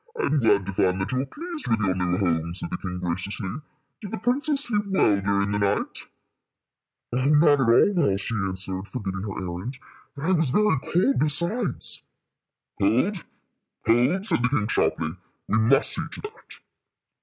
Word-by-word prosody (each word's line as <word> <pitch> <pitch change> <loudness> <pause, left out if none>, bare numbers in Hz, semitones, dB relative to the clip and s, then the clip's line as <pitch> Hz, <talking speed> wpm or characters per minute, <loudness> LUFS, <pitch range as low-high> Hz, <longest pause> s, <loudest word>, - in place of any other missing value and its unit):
"I 425 - +1
am 150 - +1
glad 100 -5 +3
to 95 - -4
find 95 0 +1
that 95 - -2
you 130 0 0
are - - -3
pleased 335 - -7
with 115 -1 +1
your 95 -3 +1
new 90 -1 -1
home," 85 -3 0
said 90 - -6
the - - -2
king, 90 -2 -5
graciously. 95 +3 -3 0.5
"Did 205 - -7
the 225 - -4
princess 280 +4 +1
sleep 210 -6 0
well 105 - +2
during 100 0 0
the 105 - 0
night?" 100 0 -1 1.1
"Oh, 125 +1 0
not 150 -1 +5
at 115 - +2
all 120 +12 +5
well," 95 - +1
she 105 - -4
answered, 95 -1 -3
forgetting 95 -7 -4
her 100 -1 -5
errand. 95 +8 -5 0.4
"And 140 +2 -6
I 185 - +2
was 160 -6 +2
very 210 -1 +2
cold, 140 -7 +2
besides." 170 - +1 0.8
"Cold? 130 - +1 0.6
cold?" 125 - +2
said 215 - +2
the 125 - +2
king, 115 -7 0
sharply. 80 +2 0 0.3
"We 110 - +2
must 135 +6 +3
see - - -1
to - - -7
that." 430 +1 -11
115 Hz, 180 wpm, -25 LUFS, -, 1.1 s, not